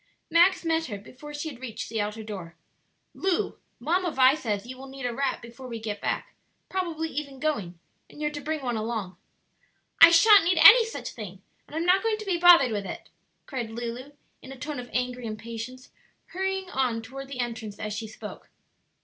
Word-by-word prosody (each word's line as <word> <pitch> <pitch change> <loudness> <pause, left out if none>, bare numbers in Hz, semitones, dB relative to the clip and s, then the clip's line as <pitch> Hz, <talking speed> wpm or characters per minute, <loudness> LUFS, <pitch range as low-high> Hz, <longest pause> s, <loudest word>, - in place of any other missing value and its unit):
Max 345 +2 +4
met 325 0 +1
her 205 - -5
before 255 +8 -12
she 295 +2 -5
had 260 -5 -11
reached 240 -4 -5
the 220 -1 -2
outer 210 +2 -4
door. 185 -6 -8 0.6
"Lu, 385 +2 -1 0.2
Mamma 350 +7 +1
Vi 260 -3 +5
says 215 -9 -3
you 255 +1 -8
will 265 +1 -10
need 270 -1 -7
a 245 - -1
wrap 270 0 -1
before 235 +2 -10
we 230 -2 -5
get 215 -2 -5
back; - - -2 0.4
probably 335 -4 -2
even 280 -2 -5
going, 210 - -2 0.3
and - - -14
you're 300 0 -1
to 290 -1 -6
bring 305 0 -3
one 245 -2 -1
along." 215 -5 -3 0.8
"I 330 - +12
sha'n't 395 +4 +7
need 360 0 +2
any 460 +6 +10
such 450 - -6
thing! 195 -4 -9 0.2
and - - -11
I'm 325 +1 -1
not 370 +2 +5
going 445 0 0
to 430 - -8
be 365 -3 0
bothered 340 -8 +7
with 205 -2 -2
it!" - - -8 0.4
cried 240 -5 -4
Lulu, 240 +4 -6 0.3
in 260 - -11
a 270 - -9
tone 290 +1 -5
of 245 0 -8
angry 250 -1 -2
impatience, 230 +4 -7 0.4
hurrying 385 +1 -2
on 245 -4 0
toward 270 +4 -8
the 270 -2 -7
entrance 225 -4 -4
as 215 -1 -4
she 220 +1 -4
spoke. 215 0 -10
260 Hz, 200 wpm, -27 LUFS, 225-320 Hz, 0.8 s, I